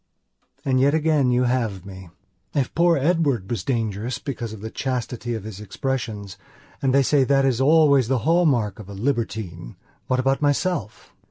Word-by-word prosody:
And 130 -2 +2
yet 140 +3 +3
again 155 -4 +2
you 125 0 +2
have 115 -7 -1
me. 95 -2 -10 0.5
If 135 -3 0
poor 170 +1 +3
Edward 140 - +1
was 110 -6 -2
dangerous 115 -1 -2
because 120 -5 -5
of 110 -2 -9
the 110 +1 -6
chastity 125 -2 -3
of 110 - -6
his 105 -2 -8
expressionsand 105 -3 -4 0.4
they 135 0 +3
say 140 +1 +3
that 135 +1 +3
is 130 -2 +1
always 140 -3 +5
the 130 +1 +1
hall 170 +2 +4
mark 115 -7 0
of 105 -2 -10
a 100 - -8
libertinewhat 105 - -3 0.4
about 135 +2 +1
myself? 145 - -1
125 Hz, 165 wpm, -23 LUFS, 110-140 Hz, 0.5 s, always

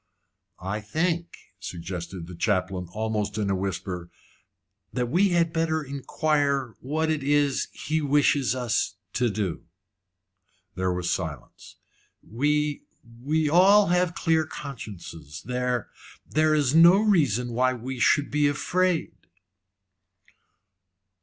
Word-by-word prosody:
"I 100 +3 -3
think," 165 +9 -2 0.2
suggested 90 -1 -6
the 90 - -10
chaplain, 90 -1 -1
almost 105 -1 -2
in 100 -2 0
a - - +1
whisper, 90 -2 -4 0.8
"that 125 -2 -2
we 190 +5 +4
had 170 -2 +1
better 160 -1 0
inquire 140 -2 -1
what 160 +4 -1
it 155 -2 -1
is 145 -1 +1
he 160 +1 -2
wishes 145 -3 +2
us 125 -3 -1 0.2
to 120 -1 +1
do." 100 -4 -3 1.1
There 95 0 -1
was 90 -1 -2
silence. 80 -8 -6 0.5
"We 150 +5 0 0.4
we 155 +3 +1
have 150 - 0
all 185 -1 +5
clear 160 -1 +2
consciences. 100 - -8
There 125 -1 -1 0.4
there 155 0 +2
is 145 -3 +2
no 170 +4 +7
reason 140 - +2
why 130 +2 +2
we 125 +2 -6
should 145 +4 +3
be 150 0 +3
afraid." 175 - 0
135 Hz, 115 wpm, -26 LUFS, 100-155 Hz, 1.1 s, no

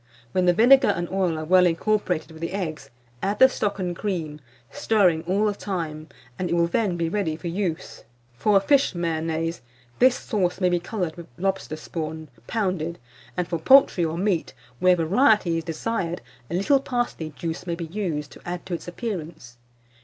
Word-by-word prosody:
When 185 +3 +1
the 175 - +6
vinegar 260 +6 +6
and 175 0 0
oil 185 -4 0
are 155 - -4
well 180 +2 +5
incorporated 180 -1 0
with 160 0 -12
the 170 +2 -3
eggs, 155 -8 -4 0.3
add 200 +2 -1
the 260 - +8
stock 205 -6 -2
and 180 -3 -3
cream, 165 -7 -3 0.3
stirring 205 - +2
all 200 +4 +2
the 210 - +1
time, 165 -6 -4 0.3
and 180 - -1
it - - +1
will 170 0 +3
then 180 +1 0
be 170 -1 0
ready 165 -3 -1
for 165 +2 -7
use. 175 -2 -3 0.3
For 200 - +3
a - - +3
fish 275 -1 +3
Mayonnaise, 165 -2 -2 0.4
this 255 0 +6
sauce 185 -5 -1
may 180 -2 +3
be 175 0 +1
coloured 175 -2 -3
with 170 - -9
lobster 195 -4 -2
spawn, 155 0 -6 0.2
pounded; 185 -6 -1 0.4
and 180 -1 0
for 170 - -2
poultry 260 - +6
or 165 0 -1
meat, 185 -3 -1 0.2
where 185 0 +5
variety 180 - +3
is 165 - -8
desired, 175 +1 -3 0.3
a 170 - -2
little 235 +10 +3
parsley 240 - -2
juice 170 +2 -5
may 170 - -1
be 170 0 -5
used 160 -5 -3
to - - -14
add 175 0 -5
to 185 - -5
its 170 - -5
appearance. 165 - -6
175 Hz, 185 wpm, -24 LUFS, 165-200 Hz, 0.4 s, the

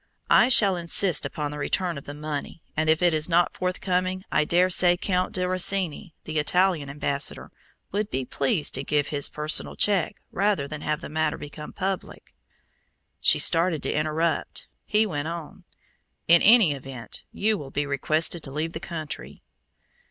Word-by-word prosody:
I 245 - +6
shall 200 -7 +4
insist 170 -2 +2
upon 145 +1 -4
the 150 - -7
return 175 +4 -1
of 140 - -9
the 145 - -8
money, 150 +1 -6
and 155 +1 0
if 160 +2 +2
it 175 -2 +4
is 155 +2 0
not 175 +1 +2
forthcoming 185 0 -2
I 155 - +2
dare 180 +3 +3
say 175 0 +5
Count 185 -1 -1
di 185 - -1
Rosini, 185 -1 0
the 155 -1 -2
Italian 175 -2 +1
ambassador, 140 0 -2 0.4
would 205 +1 -2
be 130 0 -3
pleased 140 +4 0
to 135 - -2
give 145 0 0
his 145 -2 +1
personal 150 0 0
check 200 -5 +2 0.2
rather 195 -7 0
than 150 0 -7
have 155 +2 -2
the - - -7
matter 155 0 -1
become 150 +1 -9
public." 190 0 -5 0.9
She - - +5
started 165 -2 +2
to - - -1
interrupt; 155 +2 -1 0.2
he 215 +1 +3
went 150 -7 -3
on. 165 -2 -8 0.6
"In 170 0 +7
any 220 -6 +6
event 135 -5 -8
you 215 +1 +1
will 140 - -8
be 145 +2 -2
requested 155 +4 0
to 140 - -5
leave 155 +3 -3
the 160 - -5
country." 170 -5 -7
160 Hz, 170 wpm, -25 LUFS, 150-185 Hz, 0.9 s, In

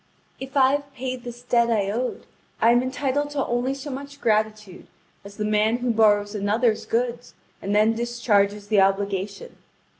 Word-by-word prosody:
If 270 +2 -6
I 265 -1 +5
have 280 -1 -3
paid 255 -1 -5
this 240 0 -9
debt 235 -1 +2
I 205 -4 +1
owed, 245 +4 -3 0.3
I 230 - +5
am 240 +1 +4
entitled 275 +2 -1
to 290 -2 -2
only 245 +3 -1
so 275 +1 -7
much 280 +2 -8
gratitude 215 -4 -1 0.4
as 200 0 -12
the 210 - -2
man 215 +2 +2
who 245 0 -1
borrows 205 -2 +3
another's 215 +2 0
goods 240 +1 -2 0.3
and 200 +1 -2
then 215 +2 +4
discharges 210 -4 0
the 205 -2 +4
obligation. 195 0 -1
235 Hz, 170 wpm, -24 LUFS, 210-255 Hz, 0.4 s, I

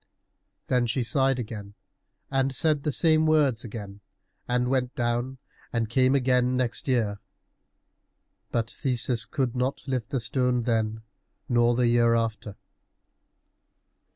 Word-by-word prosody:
Then 125 -2 +1
she 120 +3 0
sighed 135 +3 +2
again 105 -4 -7 0.6
and 135 0 +1
said 150 +2 +1
the 150 - -1
same 160 +1 +3
words 145 -7 +2
again, 105 -4 -8 0.5
and 125 0 +1
went 125 -1 -1
down 120 +2 -1 0.3
and 115 -2 -1
came 130 +2 +3
again 125 -1 +2
next 125 0 -1
year. 110 -6 0 1.3
But 115 -1 -1
Theseus 120 -3 -1
could 130 0 -2
not 130 +3 -2
lift 130 -4 -2
the 135 - -1
stone 125 +1 0
then, 110 -2 -1 0.4
nor 120 -2 +3
the 125 0 +2
year 120 0 +4
after. 110 -3 -2
125 Hz, 125 wpm, -26 LUFS, 115-130 Hz, 1.3 s, year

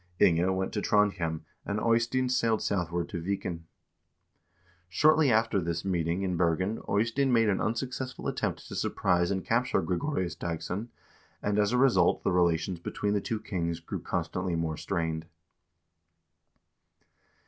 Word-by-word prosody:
Inge 85 -1 +4
went 95 0 -1
to 105 - -1
Trondhjem, 95 -7 +1 0.2
and 105 +1 -2
Eystein 115 +3 +2
sailed 115 -3 +1
southward 85 -3 -1
to 85 - -4
Viken. 85 -2 -3 1.2
Shortly 150 - +4
after 110 -2 +2
this 85 +1 -3
meeting 85 0 0
in 90 -2 -1
Bergen 90 +5 +1
Eystein 115 +6 +1
made 115 -2 +4
an 95 - +1
unsuccessful 125 +3 -3
attempt - - -2
to - - -7
surprise 90 -1 +1
and 95 -2 -2
capture 120 +3 +1
Gregorius 90 - -1
Dagss0n, 90 +6 -4 0.6
and, 105 0 +1
as 105 +1 +2
a 125 - +2
result, 120 -10 +4
the - - +1
relations 85 0 +1
between 100 +4 -2
the 100 - +1
two 110 +2 -2
kings 85 -5 -3
grew 85 - -6
constantly 90 -1 -2
more 80 -1 -1
strained. 80 -2 -2
95 Hz, 140 wpm, -29 LUFS, 85-115 Hz, 1.2 s, Inge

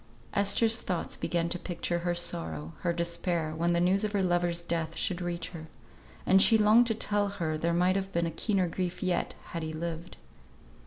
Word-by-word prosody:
Esther's 215 +3 +4
thoughts 180 -3 -3
began 170 -1 -1
to 175 +1 -2
picture 175 -1 -3
her 175 0 -1
sorrow, 80 - -3
her 175 - 0
despair, 170 -1 -2
when 170 +2 +1
the 170 - +2
news 185 +4 +3
of 210 0 -2
her 200 -2 +1
lover's 175 -1 +1
death 165 -1 -3
should 180 -1 -1
reach 170 -1 -3
her; 160 -3 -9 0.6
and 190 0 +5
she 225 - +7
longed 220 +3 +5
to 225 - 0
tell 205 -1 +1
her 170 -6 -3
there 165 +2 0
might 180 +2 +2
have 195 0 -2
been 170 -2 0
a 165 - -2
keener 195 -3 0
grief 180 +1 -3
yet 180 -2 -1 0.2
had 170 - -4
he 160 0 -4
lived. 165 +2 -6
175 Hz, 200 wpm, -29 LUFS, 170-195 Hz, 0.6 s, she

